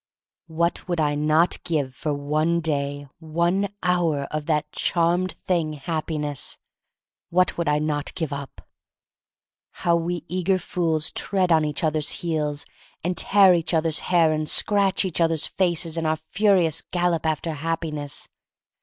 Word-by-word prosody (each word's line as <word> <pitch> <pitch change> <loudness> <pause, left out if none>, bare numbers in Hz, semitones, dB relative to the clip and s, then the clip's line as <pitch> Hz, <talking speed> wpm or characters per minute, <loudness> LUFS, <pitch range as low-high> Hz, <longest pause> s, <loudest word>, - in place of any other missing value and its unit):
What 170 +2 -1
would 175 -2 -1
I 150 -1 +2
not 155 +3 +2
give 150 -7 -1
for 150 - -3
one 155 +4 0
day, 145 -3 -2
one 170 +5 0
hour, 175 -5 +1
of 155 -1 -3
that 150 -1 0
charmed 175 +2 +1
thing 165 -4 -1
Happi 160 +1 -3
ness! 145 -2 0 0.7
What 180 +1 +2
would 170 -3 -1
I 150 - +3
not 150 -1 -2
give 160 -5 -3
up? 140 -2 -8 1.2
How 170 -1 +5
we 170 -1 -2
eager 185 +1 +1
fools 165 -4 -1
tread 185 -3 0
on 160 -1 +5
each 150 +1 -3
other's 155 0 +1 0.2
heels, 150 -3 -1 0.4
and 180 +2 -1
tear 195 +1 +5
each 170 0 0
other's 160 -1 +1
hair, 165 -3 +3
and 155 -1 -2
scratch 200 -1 +2
each 175 -2 -2
other's 165 -2 +2
faces, 170 -3 -1
in 160 - -1
our 155 - +2
furious 180 0 +1
gallop 175 -3 0
after 160 +1 -1
Happiness! 155 -2 -3
160 Hz, 150 wpm, -24 LUFS, 150-175 Hz, 1.2 s, How